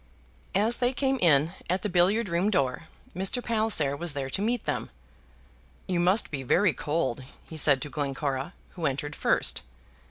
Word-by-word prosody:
As 215 +4 +3
they 245 +1 +1
came 265 0 0
in 155 -1 +4 0.2
at 185 +2 0
the - - 0
billiard 195 +5 +2
room 175 +3 +1
door, 140 -6 0 0.3
Mr. 190 +7 0
Palliser 215 -11 +2
was 170 +1 -1
there 135 -2 -4
to 195 - -2
meet 235 +3 -1
them. - - -2 1.0
"You 180 -2 0
must 185 +5 +2
be 140 -3 -3
very 165 +7 +3
cold," 140 -5 -2 0.2
he 160 - -9
said 145 -3 +3
to 145 - -7
Glencora, 140 +2 -3 0.2
who 170 -4 -2
entered 145 +2 -3
first. - - 0
170 Hz, 165 wpm, -27 LUFS, 140-205 Hz, 1.0 s, in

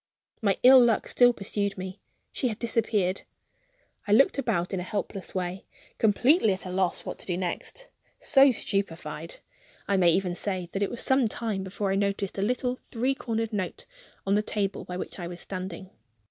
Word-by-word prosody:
My 200 -3 +2
ill 255 0 +9
luck 230 -3 +2
still 245 0 +5
pursued 200 -2 -2
me; 185 +1 -7 0.3
she 260 - -1
had 220 -3 -3
disappeared. 215 -5 0 0.9
I - - -1
looked 270 +6 +5
about 205 -9 -1
in 190 - -1
a - - -3
helpless 195 +1 -5
way, 185 0 -3 0.3
completely 225 - +4
at 190 - -7
a 185 - -5
loss 185 -1 -1
what - - -6
to - - -7
do 175 -2 -1
next 190 - -4 0.3
so 275 0 +5
stupefied, 200 - -3 0.5
I 200 - +2
may 175 -2 +5
even 185 0 +1
say, 185 -1 -2
that 195 - -3
it 200 - +1
was 240 - -3
some 265 -2 +3
time 215 -3 -3
before 195 +1 -2
I - - +1
noticed 200 -1 -1
a - - 0
little 250 +3 0
three 255 +3 -2
cornered 225 -3 -3
note 210 - -3 0.4
on 195 - +1
the 210 - +3
table 205 -2 -2
by 180 - -5
which 185 - -6
I 175 - -4
was 175 0 -8
standing. 185 -1 -6
200 Hz, 190 wpm, -27 LUFS, 185-235 Hz, 0.9 s, ill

